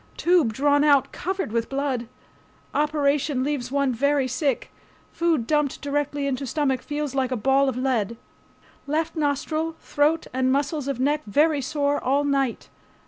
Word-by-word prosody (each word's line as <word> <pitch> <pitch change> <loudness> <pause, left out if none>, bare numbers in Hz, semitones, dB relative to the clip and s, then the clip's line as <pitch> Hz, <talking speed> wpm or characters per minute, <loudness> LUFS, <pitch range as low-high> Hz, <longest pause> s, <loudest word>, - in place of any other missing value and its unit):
Tube 340 -9 +3
drawn 285 +5 +2
out 285 -3 +4
covered 380 - -3
with 230 0 -1
blood. 270 -4 -2 0.7
Operation 290 -2 +1
leaves 270 -3 -2
one 280 -2 +1
very 280 +2 +1
sick. 260 0 -1 0.4
Food 335 -8 +1
dumped 295 0 0
directly 285 0 -2
into 275 0 -2
stomach 270 -2 0
feels 295 -2 -4
like 265 -2 0
a 255 - -1
ball 270 +4 +3
of 255 - -4
lead. 235 -4 0 0.7
Left 320 +3 -1
nostril, 310 +2 -1
throat 305 +2 +1
and 260 0 +1
muscles 285 +1 -1
of 275 -3 -2
neck 290 +3 +1
very 295 +6 +3
sore 285 +1 -1
all 275 +3 +2
night. 275 -4 0
280 Hz, 150 wpm, -24 LUFS, 260-295 Hz, 0.7 s, out